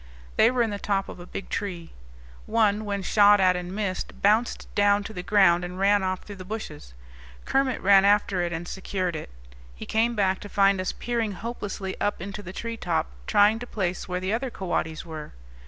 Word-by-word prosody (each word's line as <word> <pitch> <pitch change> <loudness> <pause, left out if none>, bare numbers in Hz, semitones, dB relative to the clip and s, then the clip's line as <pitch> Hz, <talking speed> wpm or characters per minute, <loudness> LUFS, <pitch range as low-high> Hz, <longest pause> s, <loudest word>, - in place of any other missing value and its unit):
They - - +5
were 250 -1 +2
in 225 - -1
the 205 - -4
top 195 -1 -1
of - - -9
a 175 - -10
big 195 - -6
tree. 180 -5 -4 0.6
One, 215 -1 +2
when 200 -1 -2
shot 205 +1 +5
at 185 -1 +4
and 180 0 -5
missed, 195 -2 -3
bounced 215 +4 +2
down 205 0 +3
to 220 - -8
the 180 - -5
ground, 180 -3 +4
and 180 +1 -6
ran 200 +1 +3
off 185 -1 -2
through 205 -1 -10
the 185 - -8
bushes; 170 - -7 0.5
Kermit 270 -1 +1
ran 195 0 +6
after 200 -2 +3
it 175 0 -1
and 170 +1 -4
secured 185 -2 -3
it. 155 - -6 0.5
He - - -8
came 230 +2 +1
back, 190 -2 +1
to 205 - -9
find 195 -1 +3
us 185 - -1
peering 230 -3 -2
hopelessly 200 -3 -5
up 205 - 0
into 200 +3 -6
the 185 -2 -8
tree 230 +4 -5
top, 165 - -1 0.2
trying 210 +2 +4
to 245 - -7
place 185 -5 -3
where 180 0 -2
the 185 +3 -2
other 255 +3 -1
coatis 170 -7 -3
were. 155 -2 -8
200 Hz, 205 wpm, -26 LUFS, 180-210 Hz, 0.6 s, ran